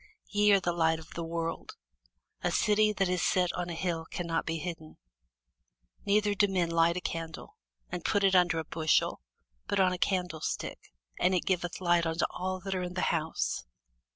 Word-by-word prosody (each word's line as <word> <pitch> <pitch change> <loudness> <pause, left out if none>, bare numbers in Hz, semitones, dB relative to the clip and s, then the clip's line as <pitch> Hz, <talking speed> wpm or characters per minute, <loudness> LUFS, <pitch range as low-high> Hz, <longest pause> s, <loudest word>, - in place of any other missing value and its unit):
Ye 210 0 +4
are 200 - +6
the 175 -2 -1
light 160 -1 +2
of 160 -1 -12
the 170 - -4
world. 165 0 -4 0.7
A - - +1
city 215 0 +3
that 195 -2 0
is 180 -1 0
set 180 -2 +2
on 175 0 -3
an 170 - -4
hill 165 -2 -2
cannot 170 0 -3
be 165 0 -1
hid. 170 +1 -4 1.3
Neither 205 0 +3
do 205 0 +3
men 180 -3 0
light 165 +1 +3
a - - -2
candle, 165 - -5 0.4
and 180 -1 -4
put 205 -1 +1
it 195 -1 +4
under 180 -2 +4
a 160 - -1
bushel, 155 - +1 0.5
but 200 - 0
on 185 -1 +4
a 180 - -4
candlestick; 180 -4 -2 0.3
and 185 - +3
it 180 - 0
giveth 175 -2 -1
light 175 -2 +2
unto 165 +1 +1
all 185 +1 -3
that 195 +1 -3
are 185 - -1
in 180 0 -5
the 185 - -1
house. 160 - -1
175 Hz, 190 wpm, -30 LUFS, 165-190 Hz, 1.3 s, are